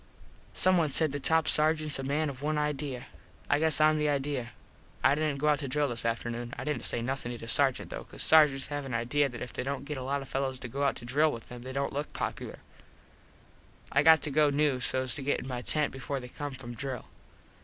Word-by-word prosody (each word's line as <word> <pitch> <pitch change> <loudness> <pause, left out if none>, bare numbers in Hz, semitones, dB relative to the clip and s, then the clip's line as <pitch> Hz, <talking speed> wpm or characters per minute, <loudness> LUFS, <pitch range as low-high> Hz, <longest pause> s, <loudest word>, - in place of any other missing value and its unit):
Someone 175 -4 +3
said 155 +2 +3
the 145 - -3
top 160 +2 +2
sargents 155 -1 +2
a - - -4
man 145 +3 0
of 135 -2 -7
one 150 +1 -1
idea. 145 -3 -2 0.5
I 145 - +4
guess 160 -2 +4
Im 155 0 +4
the 150 0 +1
idea. 140 -4 -2 0.5
I 135 - +5
didnt 150 -1 -1
go 150 +2 +1
out 150 -1 +3
to 140 - -4
drill 145 +2 0
this 120 -1 -2
afternoon. 120 +1 -3
I - - -5
didnt 150 -5 -2
say 115 - 0
nothin 130 -1 -3
to - - -6
the 115 - -9
Sargent 135 +1 +2
though - - -6
cause - - -2
sargents 150 -4 +5
have 145 -1 -3
an 130 -3 -4
idea 135 +5 +1
that 120 -1 -7
if 125 -3 -8
they - - -3
dont 135 +1 -4
get 145 -2 -4
a - - -5
lot 140 +1 -2
of - - -12
fellos 135 0 -2
to 125 - -4
go 135 +4 -5
out 140 - +1
to 120 - -8
drill 150 +5 +2
with 115 -4 -9
them 125 0 -9
they 130 +2 -7
dont 140 +1 -2
look 145 +2 -4
popular. - - -5 1.3
I 145 - +4
got 160 +1 +6
to 150 - -1
go 150 +1 +4
new 145 -2 +1
sos 130 0 +1
to - - -5
get 140 +1 0
in - - -8
my 125 -2 -4
tent 150 +3 +1
before 135 +1 -4
they 125 -1 -9
come 145 +2 -6
from 125 -2 -8
drill. 130 0 -5
140 Hz, 245 wpm, -29 LUFS, 130-150 Hz, 1.3 s, got